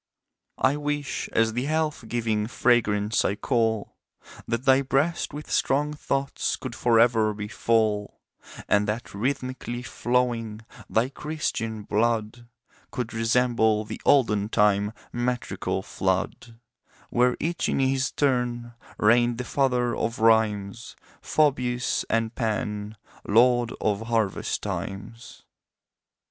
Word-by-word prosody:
I 135 Hz, +3 st, +2 dB
wish, 145 Hz, -1 st, -3 dB
as 115 Hz, -1 st, +2 dB
the 125 Hz, +3 st, -1 dB
health 155 Hz, -3 st, -1 dB
giving 110 Hz, -2 st, -1 dB
fragrance 110 Hz, -3 st, +2 dB
I 100 Hz, -, 0 dB
cull, 110 Hz, -2 st, -1 dB, 0.5 s
That 115 Hz, +3 st, -2 dB
thy 135 Hz, 0 st, +5 dB
breast 140 Hz, +6 st, 0 dB
with 150 Hz, +1 st, -8 dB
strong 150 Hz, +2 st, +1 dB
thoughts 140 Hz, -2 st, -2 dB
could 130 Hz, -3 st, -7 dB
for 120 Hz, -1 st, +3 dB
ever 115 Hz, -2 st, +3 dB
be 105 Hz, 0 st, -5 dB
full, 110 Hz, -2 st, 0 dB, 0.5 s
And 105 Hz, 0 st, +2 dB
that 110 Hz, +3 st, -2 dB
rhymthmic'ly 125 Hz, +1 st, -3 dB
flowing 120 Hz, -3 st, -1 dB, 0.2 s
thy 115 Hz, +4 st, +1 dB
Christian 135 Hz, -8 st, -3 dB
blood 115 Hz, +2 st, -1 dB, 0.4 s
Could 120 Hz, -2 st, -4 dB
resemble 115 Hz, -1 st, +2 dB
the -, -, -7 dB
olden 105 Hz, -7 st, +3 dB
time 105 Hz, -1 st, +2 dB, 0.2 s
metrical 120 Hz, 0 st, -2 dB
flood, 115 Hz, -1 st, -2 dB, 0.5 s
Where 125 Hz, +1 st, +2 dB
each 170 Hz, +2 st, -1 dB
in -, -, 0 dB
his 135 Hz, 0 st, +1 dB
turn 125 Hz, -4 st, 0 dB, 0.2 s
reigned 120 Hz, +2 st, +3 dB
the 125 Hz, -, -3 dB
father 125 Hz, -2 st, +1 dB
of 115 Hz, -, -2 dB
Rhymes 110 Hz, -1 st, +1 dB, 0.3 s
Phoebus 125 Hz, -5 st, +1 dB
and 115 Hz, 0 st, 0 dB
Pan, 105 Hz, -2 st, -3 dB, 0.3 s
lord 120 Hz, +2 st, +3 dB
of 110 Hz, +1 st, -1 dB
Harvest 110 Hz, -4 st, -1 dB
times. 110 Hz, +4 st, -6 dB
120 Hz, 115 wpm, -25 LUFS, 110-125 Hz, 0.5 s, thy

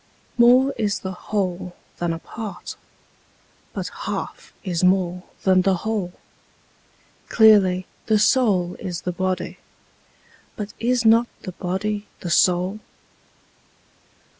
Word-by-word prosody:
More 255 Hz, +3 st, +5 dB
is 205 Hz, -2 st, 0 dB
the 190 Hz, -, -4 dB
whole 185 Hz, -2 st, -3 dB, 0.2 s
than 175 Hz, -1 st, 0 dB
a 165 Hz, -, -2 dB
part: 215 Hz, +4 st, -8 dB, 1.0 s
but -, -, -4 dB
half -, -, -6 dB
is 180 Hz, -4 st, -2 dB
more 180 Hz, -1 st, +2 dB, 0.2 s
than 185 Hz, -1 st, +4 dB
the 190 Hz, 0 st, +2 dB
whole: 205 Hz, -5 st, -2 dB, 1.2 s
Clearly, 195 Hz, -5 st, +5 dB, 0.2 s
the 220 Hz, -2 st, +4 dB
soul 205 Hz, -6 st, +2 dB
is 175 Hz, -3 st, -5 dB
the 180 Hz, -, -2 dB
body: 185 Hz, +1 st, -3 dB, 1.0 s
but 210 Hz, -1 st, -6 dB
is 245 Hz, 0 st, +1 dB
not 230 Hz, +2 st, +5 dB, 0.2 s
the 185 Hz, -, -5 dB
body 205 Hz, +4 st, -3 dB
the 175 Hz, -, -4 dB
soul? 180 Hz, +4 st, +2 dB
190 Hz, 115 wpm, -22 LUFS, 180-220 Hz, 1.2 s, More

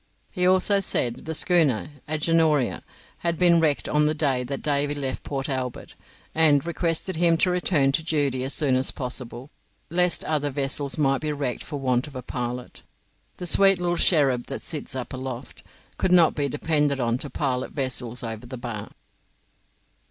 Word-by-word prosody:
He 180 Hz, -2 st, 0 dB
also 190 Hz, +2 st, +4 dB
said 120 Hz, -10 st, -1 dB
the 160 Hz, 0 st, -3 dB
schooner 155 Hz, -10 st, +2 dB, 0.2 s
'Agenoria' 155 Hz, -3 st, +1 dB, 0.4 s
had 170 Hz, -1 st, -1 dB
been 175 Hz, -1 st, +5 dB
wrecked 155 Hz, -3 st, +1 dB
on 150 Hz, 0 st, +2 dB
the 155 Hz, -, 0 dB
day 140 Hz, -5 st, 0 dB
that 135 Hz, +2 st, -5 dB
Davy 145 Hz, 0 st, +1 dB
left 135 Hz, -2 st, -3 dB
Port 135 Hz, -1 st, -4 dB
Albert, 130 Hz, -3 st, -4 dB, 0.4 s
and 150 Hz, -3 st, +4 dB
requested 170 Hz, +1 st, -2 dB
him 170 Hz, -1 st, +4 dB
to 180 Hz, -, +2 dB
return 170 Hz, -6 st, +2 dB
to 150 Hz, -, 0 dB
duty 145 Hz, -5 st, -1 dB
as 135 Hz, -, -1 dB
soon 145 Hz, -5 st, +1 dB
as 130 Hz, +1 st, +1 dB
possible, 125 Hz, 0 st, -6 dB, 0.4 s
lest 180 Hz, 0 st, +3 dB
other 150 Hz, -2 st, -1 dB
vessels 140 Hz, +1 st, 0 dB
might 135 Hz, -3 st, +1 dB
be 155 Hz, -1 st, -2 dB
wrecked 140 Hz, -4 st, -3 dB
for 145 Hz, -2 st, -6 dB
want 130 Hz, 0 st, 0 dB
of 145 Hz, -, -13 dB
a 130 Hz, -, -6 dB
pilot. 125 Hz, 0 st, -5 dB, 0.6 s
"The 180 Hz, -, -6 dB
sweet 195 Hz, +2 st, +5 dB
little 175 Hz, 0 st, 0 dB
cherub 140 Hz, -9 st, +3 dB
that 135 Hz, -, -6 dB
sits 150 Hz, -4 st, -3 dB
up 130 Hz, 0 st, -5 dB
aloft" 130 Hz, -1 st, -7 dB, 0.4 s
could 185 Hz, -, 0 dB
not 175 Hz, -3 st, +6 dB
be 145 Hz, -1 st, -1 dB
depended 145 Hz, -1 st, 0 dB
on 120 Hz, 0 st, 0 dB
to 145 Hz, -, -5 dB
pilot 130 Hz, -3 st, -2 dB
vessels 125 Hz, -3 st, -2 dB
over 115 Hz, +1 st, -6 dB
the 130 Hz, +1 st, -7 dB
bar. 115 Hz, -4 st, -6 dB
145 Hz, 175 wpm, -24 LUFS, 130-160 Hz, 0.6 s, not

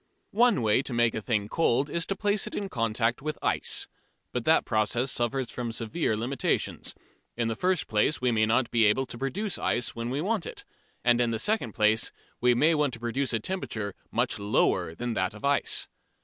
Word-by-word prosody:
One 230 Hz, -, +4 dB
way 110 Hz, +3 st, +3 dB
to 135 Hz, -, -5 dB
make 120 Hz, -1 st, +3 dB
a 110 Hz, -, -3 dB
thing 105 Hz, -2 st, 0 dB
cold 135 Hz, +1 st, +2 dB
is 165 Hz, +3 st, -2 dB
to 195 Hz, -, -1 dB
place 205 Hz, 0 st, 0 dB
it -, -, -6 dB
in 200 Hz, -1 st, -3 dB
contact 115 Hz, -2 st, 0 dB
with 155 Hz, +1 st, -3 dB
ice. -, -, 0 dB, 0.4 s
But -, -, -3 dB
that -, -, +4 dB
process 120 Hz, +5 st, +1 dB
suffers 120 Hz, +1 st, -1 dB
from 120 Hz, -2 st, -4 dB
severe 115 Hz, +1 st, -1 dB
limitations. 120 Hz, +3 st, -1 dB, 0.4 s
In 115 Hz, -1 st, 0 dB
the 115 Hz, -, -1 dB
first 180 Hz, +4 st, 0 dB
place, 110 Hz, +8 st, +1 dB
we 125 Hz, -1 st, +1 dB
may 110 Hz, -1 st, +2 dB
not 120 Hz, +2 st, +2 dB
be 115 Hz, -2 st, +4 dB
able 105 Hz, +6 st, +3 dB
to 120 Hz, -, -8 dB
procure 190 Hz, -, -2 dB
ice 120 Hz, -, 0 dB
when 115 Hz, 0 st, -3 dB
we 135 Hz, +3 st, -2 dB
want 200 Hz, +2 st, -1 dB
it. -, -, -7 dB, 0.4 s
And 120 Hz, 0 st, +4 dB
in 120 Hz, -, +2 dB
the 115 Hz, -, -1 dB
second 165 Hz, -, 0 dB
place, 110 Hz, +1 st, +3 dB, 0.3 s
we 125 Hz, 0 st, +4 dB
may 155 Hz, +7 st, +4 dB
want 150 Hz, -4 st, +1 dB
to 115 Hz, -, -6 dB
produce 120 Hz, +3 st, -1 dB
a 115 Hz, -, +1 dB
temperature 110 Hz, -, -3 dB, 0.2 s
much -, -, 0 dB
lower 100 Hz, -5 st, +1 dB
than 120 Hz, +3 st, -3 dB
that 95 Hz, -1 st, -1 dB
of 105 Hz, -, -7 dB
ice. 140 Hz, 0 st, +1 dB
120 Hz, 205 wpm, -28 LUFS, 115-145 Hz, 0.4 s, One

